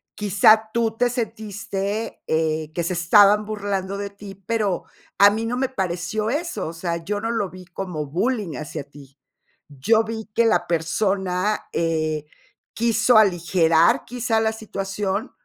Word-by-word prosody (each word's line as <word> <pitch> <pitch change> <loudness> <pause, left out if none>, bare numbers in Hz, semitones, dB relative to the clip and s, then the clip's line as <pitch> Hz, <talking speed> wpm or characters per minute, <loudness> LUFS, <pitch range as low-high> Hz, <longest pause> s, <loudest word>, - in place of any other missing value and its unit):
quizá, 215 +2 +4
tú 225 -1 0
te 245 +1 +2
sentiste, 215 -2 -4
eh, 160 -1 0
que 170 - -2
se 170 - -2
estaban 205 +5 +5
burlando 200 -2 -3
de 200 0 -4
ti, 200 -1 -11
pero 200 -1 -1 0.3
a 200 - +8
mí 220 +2 -2
no 240 +2 -2
me 265 0 0
pareció 195 +1 -2
eso, 320 - -2
o 160 - -6
sea, 170 0 -3
yo 205 +4 -3
no 225 +1 -2
lo 205 -5 -1
vi 185 0 -11
como 170 -4 -5
bullying 195 - -1
hacia 150 0 -6
ti. 140 -1 -16 0.5
Yo 185 - +2
vi 220 0 -5
que 235 - +4
la 225 - +2
persona, 185 +4 0
eh, 155 -2 -1 0.5
quiso 230 0 +3
aligerar 170 -4 +3
quizá 235 -2 -1
la 220 0 +1
situación 200 -1 -3
200 Hz, 150 wpm, -22 LUFS, 170-220 Hz, 0.5 s, a